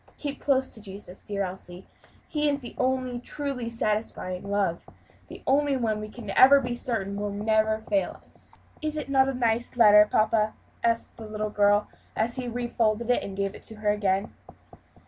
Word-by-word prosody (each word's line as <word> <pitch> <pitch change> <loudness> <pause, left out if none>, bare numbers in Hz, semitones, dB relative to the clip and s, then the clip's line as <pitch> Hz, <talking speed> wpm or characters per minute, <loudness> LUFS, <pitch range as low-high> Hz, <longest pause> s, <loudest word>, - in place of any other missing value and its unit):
Keep 285 -2 -4
close 265 -2 +2
to 220 - -10
Jesus, 195 -2 -7
dear 200 -1 -3
Elsie: 185 -1 -7 0.4
His 295 -2 +1
is - - -7
the 240 - -8
only 255 -1 0
truly 255 -2 -4
satisfying 210 -4 -2
love 195 -4 -1 0.4
the - - -11
only 280 0 +2
one 220 -4 0
we 215 0 -6
can 225 0 -10 0.4
be 245 -1 -2
certain 220 -5 -2
will 205 0 -2
never 215 +1 +1
fail 295 -1 0
us." - - -14 0.2
"Is 310 0 -2
it 300 - -4
not 270 -1 +4
a - - -1
nice 235 0 0
letter, 210 -2 +8
papa?" 215 0 +2 0.3
asked 230 0 0
the 225 -2 -8
little 215 0 -3
girl, 205 0 +3 0.3
as 235 +4 0
he 255 -1 -3
refolded 235 -1 0
and 195 -5 -1
gave 200 0 -1
it - - -11
to 220 - -6
her 210 -1 -1
again. 200 -1 0
220 Hz, 175 wpm, -27 LUFS, 205-250 Hz, 0.4 s, letter